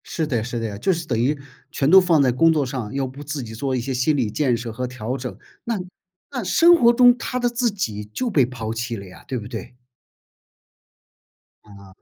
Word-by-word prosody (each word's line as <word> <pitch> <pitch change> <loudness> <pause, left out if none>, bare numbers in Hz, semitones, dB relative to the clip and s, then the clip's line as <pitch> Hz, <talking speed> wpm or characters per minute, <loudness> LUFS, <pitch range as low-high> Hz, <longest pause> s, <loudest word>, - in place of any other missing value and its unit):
是 160 - -2
的 120 -7 -1
是 120 0 -4
的， 110 -3 -4
就 190 - +2
是 165 -2 -2
等 120 -6 -1
于 140 +6 +1 0.3
全 140 -2 +1
都 190 +3 +9
放 170 -5 +3
在 130 -2 +3
工 165 +7 +4
作 150 -3 +1
上， 125 -5 -5
要 135 0 -1
不 135 +3 -8
自 145 -2 -4
己 110 -1 -8
做 130 +3 -2
一 - - 0
些 135 +3 -3
心 130 +5 +1
理 120 -5 0
建 130 -1 +1
设 115 0 -6
和 125 +3 -4
调 125 0 -4
整， 125 -1 -6 0.3
那 230 -3 -2 0.5
那 250 -4 -3
生 335 - +6
活 240 -8 +5
中 245 0 +6
他 250 - -3
的 245 0 +1
自 240 0 0
己 110 - -3
就 110 - -3
被 145 - +3
抛 115 -3 -5
弃 115 +1 -3
了 100 -2 -8
呀， 90 - -14
对 130 - -3
不 105 -3 -6
对？ 115 0 -8 1.9
啊。 100 -2 -16
130 Hz, 240 characters per minute, -22 LUFS, 115-165 Hz, 1.9 s, 都